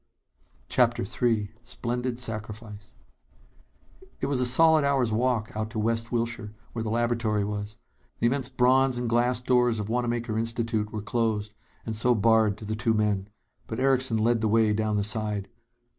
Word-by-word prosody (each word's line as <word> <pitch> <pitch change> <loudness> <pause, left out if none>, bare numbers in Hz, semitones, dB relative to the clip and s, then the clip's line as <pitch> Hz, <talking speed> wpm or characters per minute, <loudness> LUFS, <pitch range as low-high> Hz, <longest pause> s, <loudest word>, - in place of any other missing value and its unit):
CHAPTER - - +2
III 110 -1 0
Splendid 125 0 -3
Sacrifice 110 -2 -5 1.3
It - - -1
was 140 -3 0
a 125 - +3
solid 160 +4 +5
hour's 135 -5 +1
walk 115 -1 0
out 110 0 -2
to 115 - -7
West 115 +1 -1
Wilshire, 115 -2 -3 0.2
where 115 - -3
the 110 - -3
laboratory 115 -2 0
was. 105 0 -4 0.4
The - - -1
immense 130 +1 +2
bronze 130 0 +3
and 120 0 -2
glass 120 +1 +2
doors 125 -2 +2
of 105 0 -4
Wanamaker 120 -2 -1
Institute 115 -2 -2
were 105 -2 -5
closed, 105 -1 -1 0.3
and 110 - -3
so 120 +3 +3
barred 110 -1 +3
to 110 - -9
the 110 +1 -2
two 115 0 0
men. 105 -2 0 0.4
But 110 - -5
Erickson 130 -3 +2
led 115 +1 +2
the 110 - +1
way 110 0 +3
down 110 0 0
the 100 - +1
side. 105 -2 -2
115 Hz, 165 wpm, -26 LUFS, 110-120 Hz, 1.3 s, solid